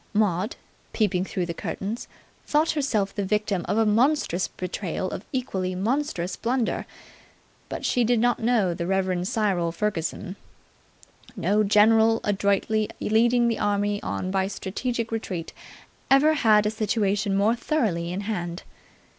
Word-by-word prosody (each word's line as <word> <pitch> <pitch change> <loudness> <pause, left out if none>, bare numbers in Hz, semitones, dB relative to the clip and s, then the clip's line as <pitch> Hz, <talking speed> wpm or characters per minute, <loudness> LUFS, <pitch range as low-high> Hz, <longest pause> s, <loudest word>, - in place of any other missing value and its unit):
Maud, 205 0 +1 0.4
peeping 185 -5 +1
through 190 -3 -2
the 170 - -4
curtains, 205 +6 -5 0.4
thought 305 +2 +2
herself 225 -10 0
the 205 - -2
victim 205 -2 0
of - - +1
a 225 - +4
monstrous 225 - +2
betrayal 185 0 -4
or - - -4
equally 190 -8 -2
monstrous 205 -3 -1
blunder. 240 -1 -1 0.8
But - - -5
she 245 - +2
did 235 0 +2
not 245 +1 +2
know 225 -6 +2
the 170 0 -4
Rev. 185 -1 0
Cyril 190 -6 0
Ferguson. 185 0 -3 1.0
No 210 +2 +2
general, 220 +2 +5
adroitly 205 +1 +1
leading 235 +2 +3
the 230 - 0
enemy 205 0 0
on 185 - -3
by 190 0 +1
strategic 230 +4 -3
retreat, 185 -7 -4 0.6
ever 280 +3 +5
had 215 -7 +4
a 210 - +1
situation 205 -2 0
more 210 +3 +3
thoroughly 210 - -1
in 185 +3 -3
hand. 175 -4 -4
210 Hz, 140 wpm, -25 LUFS, 190-230 Hz, 1.0 s, general